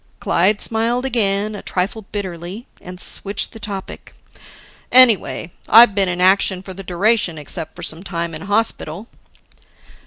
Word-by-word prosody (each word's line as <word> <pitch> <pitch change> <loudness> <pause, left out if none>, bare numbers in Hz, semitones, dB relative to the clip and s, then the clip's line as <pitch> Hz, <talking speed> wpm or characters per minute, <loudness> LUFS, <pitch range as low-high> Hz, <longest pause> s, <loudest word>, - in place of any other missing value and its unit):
Clyde 200 +4 +1
smiled 235 +3 -1
again, 210 -4 0
a 205 - -7
trifle 195 +3 -3
bitterly 190 +2 -6 0.2
and 180 0 -10
switched 200 +2 -1
the 225 - -12
topic. 200 -3 -7 0.8
"Anyway, 235 -8 +4 0.2
I've 230 -1 +8
been 195 -2 +2
in 175 0 -3
action 190 0 +2
for 190 - -8
the 195 - -9
duration 190 -1 0
except 150 +1 -7
some 160 +2 -3
time 170 -3 -4
in 155 - -7
hospital." 205 -1 -2
195 Hz, 135 wpm, -19 LUFS, 180-220 Hz, 0.8 s, I've